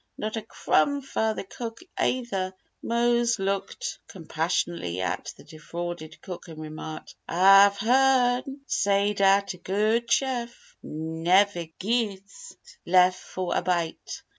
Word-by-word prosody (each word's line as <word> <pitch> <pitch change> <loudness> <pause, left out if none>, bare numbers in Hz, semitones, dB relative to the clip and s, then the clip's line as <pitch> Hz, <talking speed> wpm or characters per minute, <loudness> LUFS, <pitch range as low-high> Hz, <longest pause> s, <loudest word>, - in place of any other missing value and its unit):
Not 215 +1 -3
a 225 - -2
crumb 285 +5 +1
fer 220 -4 -1
the - - -4
cook, 225 +4 -7 0.2
ayther!" 195 -7 -1 0.3
Mose 235 0 +2
looked 195 0 -3
compassionately 160 - -2
at 95 - -3
the - - -15
defrauded 165 +1 -7
cook 180 -2 -8
and 160 -2 -10
remarked: 155 0 -8 0.2
"Ah've 195 +3 +6
hearn 255 +3 +2
say 200 -4 +1
dat 200 0 +3
a - - -12
good 215 +6 0
chef 245 -3 -1
neveh 165 +2 +1
gits 215 - -3 0.3
lef' 180 +1 +5
fo' 185 0 -5
a - - +1
bite! 175 -3 -2
195 Hz, 120 wpm, -26 LUFS, 175-235 Hz, 0.3 s, Ah've